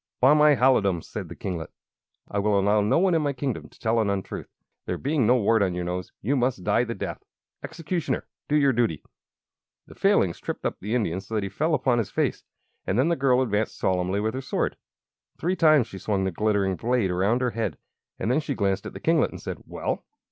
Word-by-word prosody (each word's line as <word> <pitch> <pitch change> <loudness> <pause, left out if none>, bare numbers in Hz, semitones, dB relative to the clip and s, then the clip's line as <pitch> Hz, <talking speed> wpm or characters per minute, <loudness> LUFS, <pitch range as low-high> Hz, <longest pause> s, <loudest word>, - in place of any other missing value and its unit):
"By 135 +3 +6
my 150 -1 +6
halidom!" 105 -9 +3
said - - -7
the - - -8
kinglet, 85 -4 -4 0.6
"I 100 - -2
will 100 0 +2
allow 105 +2 +3
no 105 - +2
one 185 +1 +3
in 165 - +3
my 145 -1 0
kingdom 130 -2 -4
to - - -22
tell 115 0 +1
an 110 -2 +1
untruth. 100 -1 -4 0.4
There - - -1
being 140 -4 +1
no 125 - +5
wart 115 -1 +3
on 95 -3 +1
your 90 - -2
nose, 90 0 -4
you 135 +8 +1
must 125 -7 0
die 115 - +2
the 115 0 -4
death! - - -5 0.4
Executioner, 165 +1 -3 0.2
do 150 - +1
your 140 -3 +4
duty!" 115 -11 0 0.8
The - - -14
Failings - - +2
tripped - - -5
up - - -2
the 105 +5 -2
Indian 95 -6 0
so 105 +3 -7
that 105 - 0
he 100 - -3
fell 155 - +1
upon 125 -6 +1
his 105 -4 -2
face, - - -1 0.4
and 95 - 0
then 135 +6 +3
the 170 - +2
girl 130 -2 +3
advanced 105 -2 -1
solemnly 95 +1 0
with 110 +1 -1
her 130 - -3
sword. 130 - -1 0.6
Three 180 +3 0
times 155 -7 +5
she 95 - -10
swung 100 -2 -1
the 95 - 0
glittering 100 0 0
blade 120 -5 +1
around 100 +8 +1
her 125 -1 +1
head, 115 0 -2 0.4
and 115 - -1
then 135 - +3
she 145 -3 -3
glanced 100 -3 0
at - - -8
the - - -8
kinglet 165 -1 +2
and - - -9
said: - - -6
"Well!" - - -3
115 Hz, 225 wpm, -25 LUFS, 100-135 Hz, 0.8 s, By